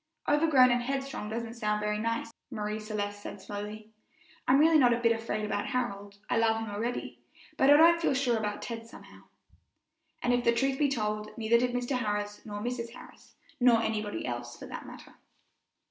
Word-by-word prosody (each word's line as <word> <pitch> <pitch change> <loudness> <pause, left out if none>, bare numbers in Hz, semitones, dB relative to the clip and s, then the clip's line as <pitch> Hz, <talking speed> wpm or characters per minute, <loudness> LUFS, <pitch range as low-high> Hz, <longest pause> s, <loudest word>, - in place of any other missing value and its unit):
"Overgrown 295 -4 +5
and 245 0 +2
headstrong 270 -3 -3
doesn't 230 +1 -4
sound 210 -2 -1
very 210 0 -1
nice," 230 +1 -2 0.2
Marie 210 0 -3
Celeste 205 -1 -4
said 205 - -7
slowly; 210 +2 -7 0.6
"I'm 255 - +6
really 315 +1 +6
not 245 -3 +5
a 235 - 0
bit 230 -1 +3
afraid 225 -2 -2
about 210 +2 -2
Harold 205 -6 -3
I - - +1
love 225 -1 +3
him 225 -2 -5
already, 230 +4 -4 0.4
but 265 - +4
I 290 - +9
don't 335 +2 +6
feel 300 - +2
sure 255 -3 +2
about 210 -2 -3
Ted, 230 -1 -6
somehow." - - -14 1.0
And 245 - +2
if 245 0 +1
the 235 - +4
truth 270 +2 +1
be 290 -2 +3
told, 215 -4 -2
neither 230 +1 +3
did 245 0 0
Mr. 245 +1 -1
Harris 205 -2 -3
nor 205 -1 -5
Mrs. 235 0 -4
Harris, - - -15 0.2
nor 245 -2 +5
anybody 215 -1 -2
else, 120 -1 -5
for - - -9
that - - -8
matter. - - -12
230 Hz, 190 wpm, -29 LUFS, 210-250 Hz, 1.0 s, I